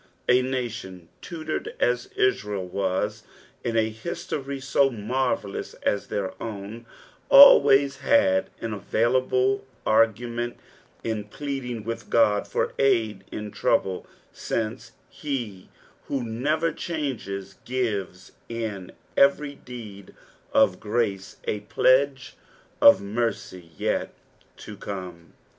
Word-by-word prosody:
A 125 +1 +5
nation 115 -9 -4
tutored 155 -2 -5
as 125 0 +1
Israel 105 -6 0
wu 95 +2 0 0.6
in 115 -1 -1
a 110 0 +2
history 140 +2 -5
so 135 +1 +2
mnrvellous 120 -2 -2
as 100 - 0
their 95 -2 -3
own, 110 +1 -7 0.4
alwaya 140 - +8
had 95 -8 +3
an 115 - -3
aviulable 130 +5 +1 0.2
argnraent 120 +2 +1 0.5
in 110 -2 -2
plead 135 +4 -5
ing 120 -3 -5
with 115 +1 -6
Ood 105 -3 +3
for - - -1
aid 110 -8 +2
in 105 -1 -5
trouble, 95 -1 0 0.3
since 110 -2 -3
he 120 -10 -5 0.4
who 135 -3 -2
never 150 +9 0
changes 135 - -4
gives 105 -8 -3 0.2
lu 110 -5 -4 0.3
every 140 +1 +3
deed 110 -8 -11 0.4
of 90 - +4
grace 105 -3 -2
a 105 - -2
pledge 130 +4 +2 0.5
of - - +8
mercy 100 -5 -3
yet - - -1 0.5
to 105 - -9
come. 90 -5 -8
115 Hz, 110 wpm, -25 LUFS, 100-130 Hz, 0.6 s, alwaya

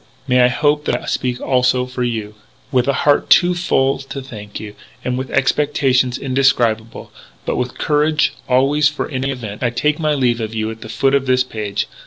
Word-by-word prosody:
May 125 -1 +4
I 125 - +6
hope 150 +4 +1
that - - 0
I - - -11
speak, 125 -1 -2
also, 125 -1 +1
for 125 0 -6
you? 110 -3 -3 0.4
"With 125 -2 +2
a 140 - +2
heart 145 -1 +3
too 180 0 +5
full 135 -6 +1
to 135 0 -7
thank 110 -6 -9
you, 105 -1 -8 0.3
and 125 - -1
with 130 +1 -4
expectations 135 -2 +1
indescribable 120 -4 0 0.3
but - - -1
with 125 0 -3
courage, 150 0 +1 0.2
always, 140 +4 +3
for 150 - -4
any 135 -2 -2
event, 115 -6 -6
I 120 - +1
take 150 +6 0
my 155 -2 +1
leave 120 -4 +1
of 110 0 -4
you 110 0 -2
at 110 0 -11
the 110 - -9
foot 135 +4 +1
of 135 -1 +1
this 130 0 +3
page. 105 -5 -3
130 Hz, 200 wpm, -18 LUFS, 120-140 Hz, 0.4 s, I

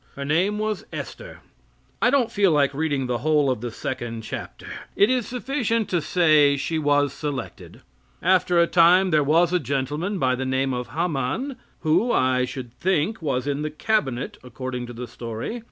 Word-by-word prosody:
Her 140 - -5
name 180 +8 +1
was 215 0 -2
Esther. - - -8 0.6
I - - +5
don't 250 -4 +2
feel 200 -3 +3
like 140 -2 +2
reading 145 -2 -1
the 125 -1 -1
whole 150 0 +2
of 125 - -3
the 120 - -3
second 115 -1 -5
chapter. - - -7 0.3
It 205 +4 +4
is 250 -3 0
sufficient 245 -3 -1
to 175 -2 +1
say 150 -3 +4
she 160 +4 -2
was 145 -2 +2
selected. 145 -3 -6 0.4
After 180 0 +3
a 170 - +6
time 180 +2 +5
there 155 -2 +4
was 165 +4 +3
a 180 - +3
gentleman 145 - -2
by 130 -6 +2
the 130 +1 -2
name 130 0 0
of 125 0 -3
Haman 165 - -2 0.3
who, 175 +10 +2
I 130 0 +2
should 125 -1 -7
think, 185 - 0
was 130 -5 -1
in 145 0 -1
the 155 - -2
cabinet, 150 - -1
according 125 0 -5
to 120 - -8
the 120 +1 -7
story. 115 - -5
150 Hz, 180 wpm, -24 LUFS, 130-185 Hz, 0.6 s, a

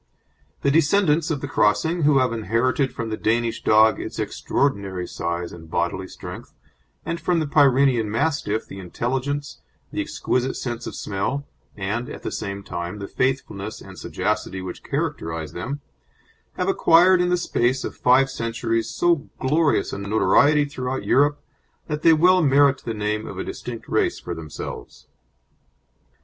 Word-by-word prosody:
The 140 - +3
descendants 160 0 +3
of 145 -4 -2
the 145 - -3
crossing, 160 +10 +2
who 145 -2 +4
have 130 -3 +2
inherited 115 +5 0
from 115 -1 -5
the 110 - -2
Danish 115 +1 0
dog 110 +1 +5
its - - -6
extraordinary 100 -9 -1
size 85 0 -3
and 80 -2 -11
bodily - - -1
strength, - - -10 0.5
and 170 0 -3
from 175 -2 +1
the 155 - 0
Pyrenean 135 -5 +4
Mastiff 110 -3 0
the 95 - -9
intelligence, 135 +9 -3 0.3
the - - -2
exquisite 130 +1 -1
sense 120 -2 -4
of - - -6
smell, 110 +8 -2 0.3
and, 105 +5 -3
at - - -9
the - - -3
same 100 -1 -5
time, 85 +1 -5
the 100 -1 -6
faithfulness 130 -6 -2
and 95 -3 -11
sagacity 95 - -2
which 95 -1 -7
characterise 80 -2 -3
them, 135 +11 -5 0.7
have - - -2
acquired 180 +2 +5
in 180 - +1
the 180 - +3
space 130 -6 0
of - - -5
five 130 +2 +4
centuries 115 -2 -2
so 170 +1 +1
glorious 150 +3 +1
a - - -4
notoriety 140 +8 +3
throughout 130 -2 -4
Europe 145 +2 +3 0.5
that 150 -1 -3
they 165 - +6
well 180 +4 +5
merit 140 -2 +4
the 115 - -3
name 105 +1 -2
of - - -7
a - - -2
distinct - - -7
race - - +1
for 85 - -5
themselves." 80 -3 -8
125 Hz, 155 wpm, -23 LUFS, 105-145 Hz, 0.7 s, they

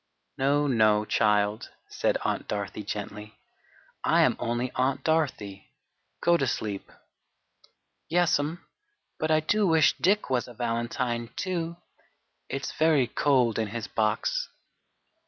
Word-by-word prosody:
"No, 145 +2 +2
no, 110 -5 +3
child," 105 0 +1 0.2
said - - 0
Aunt - - -1
Dorothy 100 0 -4
gently, 105 +1 -6 0.7
"I - - +4
am - - +3
only 120 +1 -2
Aunt 130 +1 0
Dorothy. 130 -12 -1 0.5
Go 170 0 +5
to 135 - 0
sleep." 105 -4 -3 1.2
"Yes'm; 165 -2 +1 0.5
but 155 - -1
I 155 0 +4
do 205 +6 +2
wish 160 -2 +4
Dick 205 +4 +2
was 125 -2 0
a 120 - -12
valentine, 120 0 -2
too! 170 -2 -3 0.7
It's 135 0 -3
very 155 -4 +3
cold 125 -4 +2
in 110 - 0
his 110 +1 -5
box." - - 0
125 Hz, 120 wpm, -27 LUFS, 110-155 Hz, 1.2 s, Go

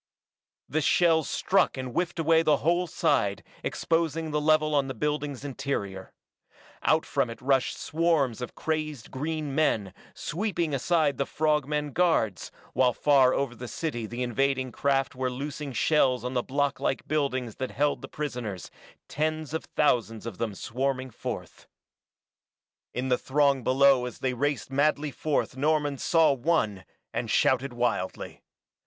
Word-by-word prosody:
The 155 - 0
shells 160 0 +3
struck 190 -6 +2
and 130 -1 -4
whiffed 175 +6 -1
away 165 0 +4
the 155 -3 +3
whole 175 +2 +2
side, - - +1 0.2
exposing 165 -1 -1
the 150 0 0
level 155 0 +3
on 140 -2 +2
the 130 - -5
building's 145 +1 -2
interior. 125 -9 -4 0.7
Out - - +2
from - - 0
it 115 - -8
rushed 135 0 +1
swarms 155 -8 +1
of 125 - -6
crazed 155 -6 -3
green 150 +1 -3
men, 110 -10 +1 0.2
sweeping 175 -3 -2
aside 145 0 +1
the 140 - 0
frog 150 -3 +1
men 150 -1 -2
guards, 160 - +1 0.2
while 125 -2 +3
far 135 -2 +4
over 140 -3 -1
the 120 +1 -8
city 120 -3 -3
the 120 +3 -4
invading 130 +1 0
craft 135 0 0
were 130 -1 -1
loosing 140 +2 -5
shells 130 -2 +2
on 125 - -3
the 125 - +1
block 140 +2 -1
like 135 - -1
buildings 130 -6 -1
that 130 - -3
held 145 +1 0
the - - -7
prisoners, 120 - -5 0.4
tens 155 0 -2
of 160 - -3
thousands 115 -7 0
of 115 -6 -7
them 110 -4 -2
swarming 130 +3 -2
forth. - - -7 1.2
In 130 +1 -3
the 125 - +2
throng 140 -1 +2
below 130 0 +4
as 125 - -8
they 130 -1 -1
raced 145 +2 -1
madly 145 +1 +1
forth 145 -2 -1
Norman 145 0 +1
saw 165 -3 +4
one, 120 - 0 0.3
and - - -2
shouted 130 +1 +2
wildly. 120 -6 -2
140 Hz, 150 wpm, -27 LUFS, 125-155 Hz, 1.2 s, away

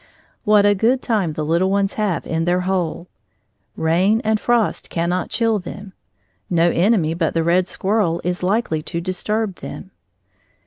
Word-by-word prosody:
What 210 -1 +5
a 205 - +5
good 235 +6 +1
time 200 -9 0
the 155 0 -3
little 170 +4 +2
ones 200 0 +1
have 210 -5 -1
in 165 0 -1
their 180 +1 +1
hole! 180 -2 -2 0.7
Rain 180 +7 +2
and 220 0 +1
frost 240 -2 0
cannot 175 +2 -1
chill 225 -2 +1
them; 195 +2 -9 0.6
no 170 -1 +3
enemy 175 -4 +2
but 165 -1 -1
the 165 - +2
red 175 +2 +2
squirrel 190 -5 0
is 180 0 -2
likely 185 -4 0
to 170 +2 -4
disturb 195 +3 -2
them. 190 - -9
185 Hz, 155 wpm, -20 LUFS, 170-210 Hz, 0.7 s, What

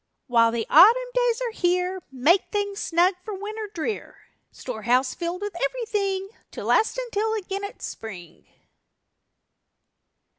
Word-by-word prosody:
While 230 -3 +4
the 230 -1 -2
Autumn 470 +10 +6
days - - +1
are 485 -2 -1
here 365 -1 0
Make 295 +9 +3
things 405 -1 -2
snug 355 0 +2
for 425 0 -5
Winter 425 +2 -6
drear; 405 +4 -4 0.3
Storehouse 250 +2 -1
filled 350 +3 -4
with 410 -3 -5
everything 395 - -1 0.2
To - - -6
last 445 - +2
until 445 -3 -1
again 395 -1 -4
it's 405 - -6
Spring. 180 -7 -9
390 Hz, 125 wpm, -24 LUFS, 315-435 Hz, 0.3 s, Autumn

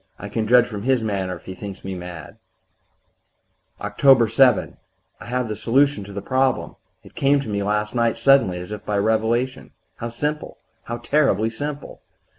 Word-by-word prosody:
I 105 - -8
can 110 +1 -2
judge 120 +1 +6
from 105 -4 -6
his 125 0 +1
manner 95 -4 -2
if 85 - -15
he 95 - -6
thinks 100 0 -9
me 95 - -4
mad. 90 -3 -9 1.4
"Oct. 115 +2 +4
7. 125 +2 +3 0.4
I - - -11
have 125 0 -2
the 110 - -4
solution 120 -1 +1
of 100 - -10
the 100 - -5
problem; 130 -1 0 0.3
it - - -16
came 140 +1 +2
to 135 - -8
me 100 -1 -2
last 105 +1 -1
night 115 -2 +1
suddenly, 135 -10 +4
as 90 +3 -8
by 105 - -2
revelation. 110 +5 0 0.2
How 115 - -5
simple 150 +6 -4 0.3
how 120 - -4
terribly 135 -6 +1
simple! 145 +5 -6
115 Hz, 170 wpm, -22 LUFS, 105-130 Hz, 1.4 s, judge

